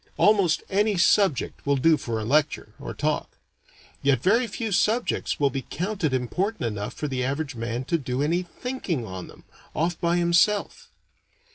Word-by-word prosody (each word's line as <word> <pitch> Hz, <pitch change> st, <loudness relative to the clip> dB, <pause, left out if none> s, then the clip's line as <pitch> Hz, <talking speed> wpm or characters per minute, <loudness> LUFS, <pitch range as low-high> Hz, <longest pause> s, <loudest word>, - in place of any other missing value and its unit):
Almost 200 Hz, -6 st, +3 dB
any 205 Hz, +1 st, +1 dB
subject 175 Hz, -4 st, +2 dB
will 140 Hz, 0 st, +2 dB
do 160 Hz, +4 st, +4 dB
for 115 Hz, -6 st, -3 dB
a 110 Hz, -, -4 dB
lecture, 145 Hz, +5 st, +1 dB
or -, -, -7 dB
talk; -, -, -2 dB, 0.6 s
yet 135 Hz, -3 st, +2 dB
very 230 Hz, +6 st, +3 dB
few 220 Hz, +1 st, -4 dB
subjects 220 Hz, +5 st, +1 dB
will 140 Hz, -2 st, +3 dB
be 130 Hz, -1 st, -5 dB
counted 180 Hz, -3 st, -2 dB
important 155 Hz, -, -1 dB
enough 105 Hz, -3 st, -3 dB
for 150 Hz, -, -3 dB
the 130 Hz, -2 st, -2 dB
average 140 Hz, +2 st, -2 dB
man 115 Hz, +1 st, -3 dB
to 165 Hz, +6 st, 0 dB
do 130 Hz, 0 st, -2 dB
any 170 Hz, +4 st, +1 dB
thinking 180 Hz, -, -4 dB
on 95 Hz, -2 st, -7 dB
them, -, -, -15 dB, 0.3 s
off 165 Hz, +2 st, -1 dB
by 170 Hz, 0 st, +2 dB
himself. 175 Hz, +4 st, +2 dB
160 Hz, 165 wpm, -25 LUFS, 130-195 Hz, 0.6 s, do